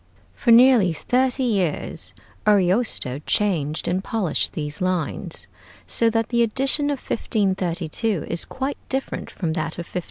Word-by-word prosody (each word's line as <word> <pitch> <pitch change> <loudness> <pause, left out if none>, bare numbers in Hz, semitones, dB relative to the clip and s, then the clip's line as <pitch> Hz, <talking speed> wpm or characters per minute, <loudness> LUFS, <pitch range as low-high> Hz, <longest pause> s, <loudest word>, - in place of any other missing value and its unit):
For 240 - -3
nearly 235 -6 +6
thirty 255 - 0
years 195 -10 -1 0.4
Ariosto 190 - +2
changed 165 -8 0
and 185 +2 -1
polished 205 -8 -1
these 150 +1 -3
lines, 185 -3 -2 0.4
so 230 - +2
that 225 0 -1
the 235 -1 +2
edition 270 +6 +4
of 285 -2 -2
1532 190 -2 -1
is 170 - +2
quite 270 +2 -4
different 265 0 -3
from 165 -4 -3
that 160 0 -3
of 170 - -5
1516. - - -20
200 Hz, 135 wpm, -22 LUFS, 170-240 Hz, 0.4 s, nearly